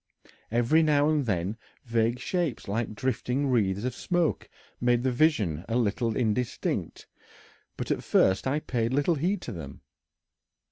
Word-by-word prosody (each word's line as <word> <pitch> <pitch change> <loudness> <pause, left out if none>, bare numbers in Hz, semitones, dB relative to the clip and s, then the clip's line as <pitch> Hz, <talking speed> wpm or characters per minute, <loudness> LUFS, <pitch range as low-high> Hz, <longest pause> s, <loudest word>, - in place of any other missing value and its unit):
Every 120 +8 +3
now 150 -1 +3
and 145 -5 0
then 95 +2 -1 0.3
vague 115 0 +1
shapes 170 -2 -2
like 110 +2 -2
drifting 130 +3 -1
wreaths 100 -4 +1
of 125 -1 -1
smoke 175 +3 -1 0.3
made 120 0 +2
the 130 - +2
vision 115 - +2
a 115 - 0
little 115 -1 0
indistinct, 120 0 -1 0.7
but - - -3
at - - -1
first 95 +6 +3
I 145 +3 0
paid 120 -3 -1
little 145 +5 +2
heed 175 +6 -1
to - - -5
them. 75 -8 -8
120 Hz, 145 wpm, -27 LUFS, 110-145 Hz, 0.7 s, Every